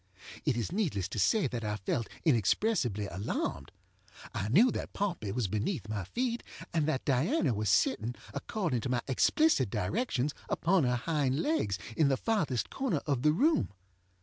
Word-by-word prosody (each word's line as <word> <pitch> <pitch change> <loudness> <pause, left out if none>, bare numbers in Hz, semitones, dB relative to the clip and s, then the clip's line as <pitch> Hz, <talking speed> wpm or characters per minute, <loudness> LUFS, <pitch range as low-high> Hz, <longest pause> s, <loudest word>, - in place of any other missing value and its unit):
It 140 -6 +1
is 120 +6 -2
needless 160 - 0
to 110 - -4
say 150 - +3
that 120 -3 -3
I 105 0 -1
felt 105 +3 -2 0.2
inexpressibly 120 - +2
alarmed. 85 -7 -3 0.6
I 100 - -2
knew 225 - +6
that - - -5
Pompey 175 - -2
was 115 -1 -1
beneath 110 - -2
my 105 -3 -3
feet, 240 - -2 0.3
and 160 -3 +1
that 145 -4 -1
Diana 140 - +2
was 105 -1 -1
sitting, 110 +5 +2 0.2
according 170 - -2
to 130 - -3
my 125 -1 +1
explicit 135 - +3
directions, 140 - -1 0.2
upon 175 -3 +2
her 125 0 +2
hind 140 0 0
legs, 105 - 0 0.2
in 155 - +4
the 135 -1 +2
farthest 160 - 0
corner 255 - -1
of 140 -5 0
the 150 +2 +4
room. 295 - +2
130 Hz, 165 wpm, -31 LUFS, -, 0.6 s, knew